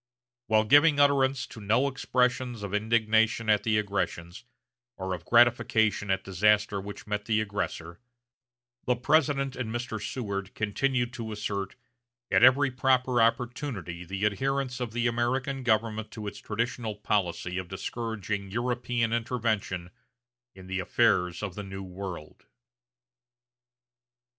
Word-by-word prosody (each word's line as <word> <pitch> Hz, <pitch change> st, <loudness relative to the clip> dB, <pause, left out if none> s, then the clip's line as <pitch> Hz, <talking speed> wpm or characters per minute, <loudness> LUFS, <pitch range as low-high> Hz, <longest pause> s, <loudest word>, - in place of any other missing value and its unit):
While 110 Hz, -1 st, +4 dB
giving 145 Hz, +6 st, +5 dB
utterance 135 Hz, -2 st, +3 dB
to 110 Hz, -, -11 dB
no 115 Hz, +7 st, +2 dB
expressions 125 Hz, -3 st, 0 dB
of 100 Hz, -1 st, -5 dB
indignation 110 Hz, +1 st, +2 dB
at 105 Hz, -, +3 dB
the 110 Hz, -1 st, +1 dB
aggressions, 100 Hz, -1 st, -3 dB, 0.5 s
or 95 Hz, -1 st, -3 dB
of 90 Hz, -, -7 dB
gratification 115 Hz, -3 st, +3 dB
at 95 Hz, -, +1 dB
disaster 105 Hz, +1 st, +2 dB
which 100 Hz, +1 st, -9 dB
met 105 Hz, -1 st, -3 dB
the 110 Hz, -1 st, +2 dB
aggressor, 95 Hz, -5 st, -4 dB, 0.9 s
the 125 Hz, -, +2 dB
President 140 Hz, +1 st, +1 dB
and 125 Hz, -4 st, -4 dB
Mr. 120 Hz, -2 st, -4 dB
Seward 100 Hz, -6 st, -4 dB
continued 120 Hz, +3 st, 0 dB
to 115 Hz, -2 st, -5 dB
assert, 105 Hz, -2 st, -4 dB, 0.6 s
at -, -, +4 dB
every 130 Hz, +2 st, +6 dB
proper 130 Hz, -1 st, +2 dB
opportunity 115 Hz, -, -1 dB
the 95 Hz, +3 st, -3 dB
adherence 130 Hz, +4 st, -1 dB
of 120 Hz, -3 st, -3 dB
the 120 Hz, 0 st, -1 dB
American 125 Hz, +3 st, 0 dB
government 110 Hz, -2 st, 0 dB
to 110 Hz, -3 st, -8 dB
its 100 Hz, -, -6 dB
traditional 115 Hz, 0 st, -3 dB
policy 90 Hz, -3 st, -1 dB
of 95 Hz, -, -6 dB
discouraging 100 Hz, 0 st, -4 dB
European 120 Hz, +1 st, -1 dB
intervention 110 Hz, -6 st, -2 dB, 0.6 s
in 95 Hz, -1 st, -12 dB
the 95 Hz, +1 st, -3 dB
affairs 90 Hz, -3 st, +1 dB
of 100 Hz, -4 st, -3 dB
the 105 Hz, -, -6 dB
New 95 Hz, 0 st, -7 dB
World. 90 Hz, -8 st, -8 dB
110 Hz, 130 wpm, -28 LUFS, 100-125 Hz, 0.9 s, every